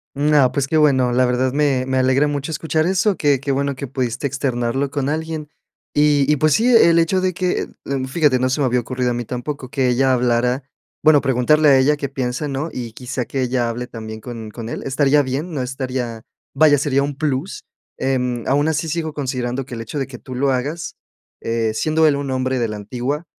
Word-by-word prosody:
No, 145 Hz, -2 st, +3 dB
pues, 140 Hz, -2 st, -1 dB
qué 160 Hz, +2 st, +1 dB
bueno. 130 Hz, -5 st, +3 dB
La 125 Hz, +1 st, +3 dB
verdad 125 Hz, +1 st, 0 dB
me 140 Hz, -3 st, +1 dB
me 130 Hz, 0 st, -1 dB
alegra 130 Hz, +3 st, +3 dB
mucho 145 Hz, +1 st, -3 dB
escuchar 155 Hz, 0 st, 0 dB
eso. 190 Hz, +1 st, +1 dB
Qué 145 Hz, -3 st, +2 dB
qué 140 Hz, +1 st, -2 dB
bueno 140 Hz, 0 st, -1 dB
que 140 Hz, +1 st, -6 dB
pudiste 125 Hz, 0 st, -3 dB
externarlo 135 Hz, -1 st, -1 dB
con 140 Hz, 0 st, -2 dB
alguien. 155 Hz, -1 st, -3 dB, 0.4 s
Y 145 Hz, -1 st, +3 dB
y, 150 Hz, -, +3 dB
pues, 155 Hz, +1 st, +3 dB
sí, 225 Hz, -, +2 dB
e 225 Hz, -, +7 dB
el 170 Hz, 0 st, +4 dB
hecho 185 Hz, +3 st, +2 dB
de 185 Hz, 0 st, 0 dB
que, 180 Hz, +1 st, -1 dB, 0.4 s
fíjate, 145 Hz, -3 st, +2 dB
no 130 Hz, +1 st, +1 dB
se 145 Hz, +3 st, 0 dB
me -, -, +3 dB
había 125 Hz, 0 st, +2 dB
ocurrido 125 Hz, +1 st, -2 dB
a -, -, -1 dB
mí 120 Hz, 0 st, -3 dB
tampoco 130 Hz, +2 st, -5 dB
que 130 Hz, 0 st, 0 dB
ella 130 Hz, +2 st, +3 dB
hablara, 125 Hz, +1 st, +1 dB, 0.4 s
bueno, 150 Hz, -2 st, +6 dB
preguntarle 145 Hz, +4 st, +3 dB
a 135 Hz, -, +6 dB
ella 145 Hz, +3 st, +3 dB
qué 140 Hz, -2 st, -4 dB
piensa, 130 Hz, +2 st, -3 dB
¿no? 140 Hz, +3 st, -3 dB
Y 120 Hz, -3 st, -6 dB
quizá 125 Hz, +1 st, -4 dB
que 135 Hz, -, -3 dB
ella 125 Hz, -1 st, 0 dB
hable 125 Hz, +1 st, -4 dB
también 110 Hz, -2 st, -8 dB
con 115 Hz, -2 st, -7 dB
con 115 Hz, +1 st, -7 dB
él. -, -, -5 dB
Estaría 140 Hz, +2 st, +3 dB
bien, 140 Hz, +6 st, -3 dB
no 140 Hz, -, -2 dB
estaría, 125 Hz, -3 st, -4 dB, 0.3 s
vaya, 155 Hz, -2 st, +5 dB
sería 140 Hz, -1 st, +1 dB
un 145 Hz, 0 st, -3 dB
plus, 150 Hz, +3 st, -2 dB, 0.3 s
em, 125 Hz, -3 st, -1 dB
aun 145 Hz, +3 st, +2 dB
así 160 Hz, +1 st, -1 dB
sigo 160 Hz, -1 st, -2 dB
considerando 130 Hz, -2 st, -3 dB
que 125 Hz, -, -8 dB
el 115 Hz, -, -5 dB
hecho 115 Hz, +6 st, -5 dB
de 135 Hz, -, -2 dB
que 130 Hz, -2 st, -9 dB
tú 130 Hz, -, -10 dB
lo 135 Hz, +1 st, +1 dB
hagas, 145 Hz, +6 st, -3 dB, 0.5 s
eh, 115 Hz, -1 st, -1 dB
siendo 155 Hz, +5 st, +2 dB
él 145 Hz, -, +3 dB
un 140 Hz, -1 st, -3 dB
hombre 130 Hz, 0 st, -1 dB
de 120 Hz, -, 0 dB
la 105 Hz, -, -5 dB
antigua, 125 Hz, +9 st, -4 dB
135 Hz, 220 wpm, -20 LUFS, 125-150 Hz, 0.5 s, e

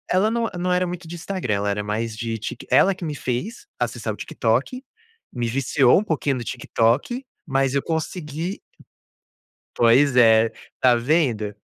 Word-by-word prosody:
ela 205 Hz, +4 st, +3 dB
não 235 Hz, 0 st, 0 dB
não 180 Hz, +1 st, 0 dB
era 180 Hz, 0 st, +2 dB
muito 175 Hz, -1 st, -6 dB
de 170 Hz, -, -7 dB
Instagram, 175 Hz, -, -2 dB
ela 100 Hz, +1 st, -1 dB
era 105 Hz, +1 st, -2 dB
mais 110 Hz, +2 st, -3 dB
de 115 Hz, -1 st, -3 dB
Tik 110 Hz, -, -7 dB
ela 195 Hz, -, +5 dB
que 180 Hz, -, -10 dB
me 150 Hz, -2 st, -3 dB
fez 180 Hz, -, -4 dB
acessar -, -, -2 dB
o -, -, -11 dB
TikTok, 255 Hz, 0 st, -1 dB, 0.5 s
me 120 Hz, -2 st, -2 dB
viciou 130 Hz, +1 st, +3 dB
um 210 Hz, -, -2 dB
pouquinho 150 Hz, -7 st, -1 dB
no 120 Hz, -, -5 dB
TikTok, 125 Hz, -, 0 dB, 0.2 s
mas 135 Hz, -1 st, +1 dB
eu 140 Hz, -, +2 dB
consegui 160 Hz, +2 st, -4 dB, 1.1 s
Pois 125 Hz, +3 st, +4 dB
é, 115 Hz, -2 st, +5 dB, 0.3 s
tá 125 Hz, -2 st, +5 dB
vendo? 120 Hz, -6 st, 0 dB
135 Hz, 165 wpm, -22 LUFS, 115-175 Hz, 1.1 s, ela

